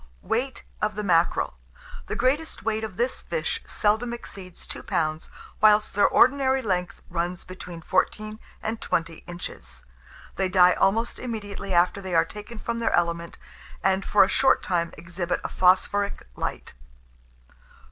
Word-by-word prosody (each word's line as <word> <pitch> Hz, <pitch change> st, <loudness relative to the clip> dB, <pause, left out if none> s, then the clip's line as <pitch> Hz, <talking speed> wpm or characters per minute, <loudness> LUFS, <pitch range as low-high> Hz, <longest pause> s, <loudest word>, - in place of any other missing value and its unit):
WEIGHT 250 Hz, +3 st, -2 dB, 0.2 s
OF 210 Hz, -1 st, 0 dB
THE 210 Hz, -, -3 dB
MACKEREL. 170 Hz, -3 st, +2 dB, 0.5 s
The -, -, -3 dB
greatest 275 Hz, +6 st, 0 dB
weight 220 Hz, 0 st, -1 dB
of 205 Hz, -4 st, -6 dB
this 245 Hz, +2 st, -1 dB
fish 485 Hz, -, -2 dB
seldom 220 Hz, +3 st, +1 dB
exceeds 190 Hz, -6 st, -9 dB
2 -, -, -6 dB
lbs., 155 Hz, -1 st, -1 dB, 0.3 s
whilst 210 Hz, 0 st, +5 dB
their 205 Hz, -, +5 dB
ordinary 265 Hz, 0 st, +4 dB
length 180 Hz, -4 st, -2 dB
runs 175 Hz, +1 st, -2 dB
between 180 Hz, -2 st, -9 dB
14 215 Hz, +5 st, 0 dB, 0.2 s
and 220 Hz, +1 st, -3 dB
20 165 Hz, -1 st, -1 dB
inches. 70 Hz, -, -8 dB, 0.5 s
They 190 Hz, -1 st, +1 dB
die 180 Hz, -1 st, +6 dB
almost 225 Hz, +5 st, +1 dB
immediately 205 Hz, -5 st, -5 dB
after 180 Hz, +3 st, +3 dB
they 185 Hz, -2 st, -3 dB
are 165 Hz, 0 st, +5 dB
taken 210 Hz, +6 st, -9 dB
from 230 Hz, +2 st, -3 dB
their 230 Hz, -, 0 dB
element, 170 Hz, -1 st, 0 dB, 0.5 s
and, 190 Hz, 0 st, +2 dB
for 205 Hz, -, +5 dB
a -, -, +2 dB
short 265 Hz, -, +3 dB
time, 170 Hz, -2 st, 0 dB
exhibit 175 Hz, +1 st, -3 dB
a -, -, -3 dB
phosphoric 200 Hz, +2 st, +2 dB
light. -, -, -4 dB
195 Hz, 145 wpm, -25 LUFS, 175-225 Hz, 0.5 s, die